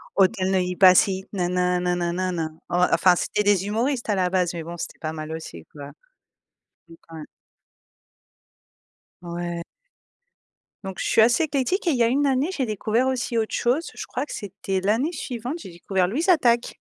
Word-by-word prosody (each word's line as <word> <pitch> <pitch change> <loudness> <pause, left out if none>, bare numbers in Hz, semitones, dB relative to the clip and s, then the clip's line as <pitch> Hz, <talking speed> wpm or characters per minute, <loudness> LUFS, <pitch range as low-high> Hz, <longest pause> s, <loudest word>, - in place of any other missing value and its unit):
Auteuil 190 -1 +2
Neuilly 180 -1 0
Passy 190 +1 +5
nin 180 -2 -1
nin 180 0 +1
nin 180 0 0
nin 175 -1 -1
nin 185 0 -1
nin. 160 -1 -4
Ouais, 180 +1 +3
enfin, 180 -1 +5
c'était 210 - -1
des 200 -1 +2
humoristes, 235 +3 -1
à 205 - +2
la 180 -1 +1
base, 180 -2 +1
mais, 165 - -5
bon, 170 +1 -7
c'était - - -7
pas 155 0 -4
mal 155 0 -6
aussi, 160 - -8
quoi. 145 -1 -9 1.0
Oui, 165 - -14
quand 165 - -12
même. 150 - -8 2.0
Ouais. 175 0 -4 1.2
Donc, 190 -1 -6
je - - -2
suis - - +4
assez 235 +7 +4
éclectique 295 - -1
et 335 - +4
il 270 - +1
y - - +4
a - - +4
une 280 +4 +2
année, 270 +4 +1
j'ai 270 - 0
découvert 220 +3 0
aussi 250 -2 -1
autre 220 -1 -1
chose. 255 +8 0
Je - - -7
crois - - -3
que - - -10
c'était 195 -1 -4
l'année 225 - +1
suivante, 250 -2 -5
j'ai 190 - -10
découvert 180 +1 -1
Louise 310 - -2
Attaque. 240 -8 +3
190 Hz, 195 wpm, -24 LUFS, 175-240 Hz, 2.0 s, Passy